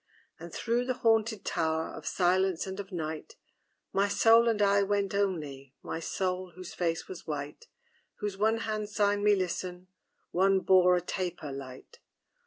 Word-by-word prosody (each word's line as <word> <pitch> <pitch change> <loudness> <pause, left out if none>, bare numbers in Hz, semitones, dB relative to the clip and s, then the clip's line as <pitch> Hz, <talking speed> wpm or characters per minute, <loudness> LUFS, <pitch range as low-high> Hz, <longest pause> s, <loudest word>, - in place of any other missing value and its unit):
And 170 +1 -9
through 240 +6 0
the 255 0 -1
haunted 225 -2 +1
tower 160 -1 0
Of - - -8
silence 185 -1 +2
and 190 +1 -6
of 200 -1 -7
night, 160 -3 -5 0.6
My 200 +1 +3
Soul 230 +3 +5
and 220 -2 0
I 200 0 +4
went 200 0 0
only, 150 -9 -2
My 160 - -4
Soul, 185 +1 -2
whose 185 -1 -9
face 165 -2 -1
was 185 - -9
white, 150 - -5 0.5
Whose 205 -2 -4
one 220 +3 +1
hand 215 -2 -3
signed 205 -1 +1
me 210 0 +5
listen, 185 -1 -4 0.4
One 190 +2 +3
bore 180 -1 +5
a 180 - +1
taper 175 -4 -4
light. 130 -1 -9
190 Hz, 160 wpm, -30 LUFS, 170-205 Hz, 0.6 s, Soul